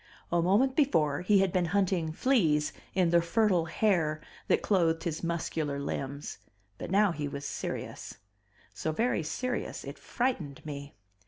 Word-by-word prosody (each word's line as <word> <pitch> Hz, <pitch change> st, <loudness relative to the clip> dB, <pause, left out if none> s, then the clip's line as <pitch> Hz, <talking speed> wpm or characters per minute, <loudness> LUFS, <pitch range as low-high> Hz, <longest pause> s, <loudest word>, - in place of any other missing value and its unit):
A 170 Hz, 0 st, +3 dB
moment 215 Hz, +10 st, +3 dB
before 155 Hz, -, +2 dB
he 195 Hz, +2 st, +4 dB
had 190 Hz, -2 st, +2 dB
been 180 Hz, -1 st, +2 dB
hunting 180 Hz, -5 st, +1 dB
fleas 160 Hz, -, +2 dB, 0.2 s
in 180 Hz, -3 st, +3 dB
the 170 Hz, 0 st, +5 dB
fertile 180 Hz, -1 st, +2 dB
hair 165 Hz, -3 st, +1 dB, 0.3 s
that -, -, +2 dB
clothed 165 Hz, -5 st, +2 dB
his 165 Hz, -2 st, -3 dB
muscular 160 Hz, -4 st, -2 dB
limbs, 140 Hz, 0 st, -4 dB, 0.4 s
but -, -, -5 dB
now 200 Hz, 0 st, +4 dB
he 150 Hz, -3 st, -3 dB
was 140 Hz, 0 st, -6 dB
serious; -, -, -5 dB, 0.6 s
so 160 Hz, -, -2 dB
very 230 Hz, +4 st, +1 dB
serious 250 Hz, +11 st, -3 dB
it -, -, -8 dB
frightened 185 Hz, -, -2 dB
me. 145 Hz, -1 st, -7 dB
170 Hz, 150 wpm, -30 LUFS, 155-200 Hz, 0.6 s, the